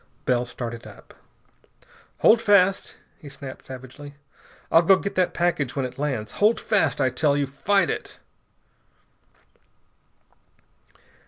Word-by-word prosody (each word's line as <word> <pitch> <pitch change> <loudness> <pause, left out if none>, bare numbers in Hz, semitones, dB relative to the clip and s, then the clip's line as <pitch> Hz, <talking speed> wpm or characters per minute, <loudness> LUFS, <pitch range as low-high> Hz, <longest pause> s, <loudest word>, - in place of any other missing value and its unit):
Bell 125 -1 +1
started 120 -2 -7
up. - - -15 1.1
"Hold 225 +1 +5
fast," 200 -3 +2 0.2
he 145 - -11
snapped 140 -1 -10
savagely. 130 +2 -10 0.6
"I'll 165 - +6
go 190 +3 +5
get 200 +1 -4
that 185 -1 0
package 170 -7 -1
when 135 -2 -1
it 125 +1 -8
lands. 130 -7 -3
Hold 215 +3 +4
fast, 195 -10 0
I 130 - +2
tell 140 +3 +1
you! 145 - +1
Fight 185 +9 +1
it!" - - -6
145 Hz, 120 wpm, -24 LUFS, 130-185 Hz, 1.1 s, I'll